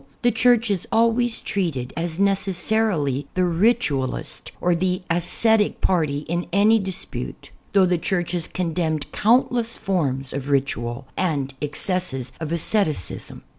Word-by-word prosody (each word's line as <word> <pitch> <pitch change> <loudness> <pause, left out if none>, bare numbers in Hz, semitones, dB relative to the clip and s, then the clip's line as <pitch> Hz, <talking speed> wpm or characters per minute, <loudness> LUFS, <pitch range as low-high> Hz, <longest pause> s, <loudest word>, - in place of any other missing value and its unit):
The 240 - +4
Church 235 0 +3
is 185 -3 -1
always 230 +1 +2
treated 160 -11 -2
as 165 0 -3
necessarily 195 - +1
the 185 - +2
ritualist 170 - 0
or 180 - +2
the 180 +1 0
ascetic 210 +6 +2
party 155 -6 +1
in 170 +3 -3
any 210 +4 +4
dispute; 190 -1 -6 0.2
thougli 190 -2 +5
the 180 - +2
Church 175 0 -1
has 175 -3 -1
condemned 165 -4 -2
countless 235 0 +2
forms 140 -9 -1
of 140 0 -4
ritual 135 -2 -1
and 145 -7 -1
ex 150 0 +1
cesses 180 -10 0
of 160 -1 -4
asceticism. 170 - -1
180 Hz, 130 wpm, -23 LUFS, 150-205 Hz, 0.2 s, thougli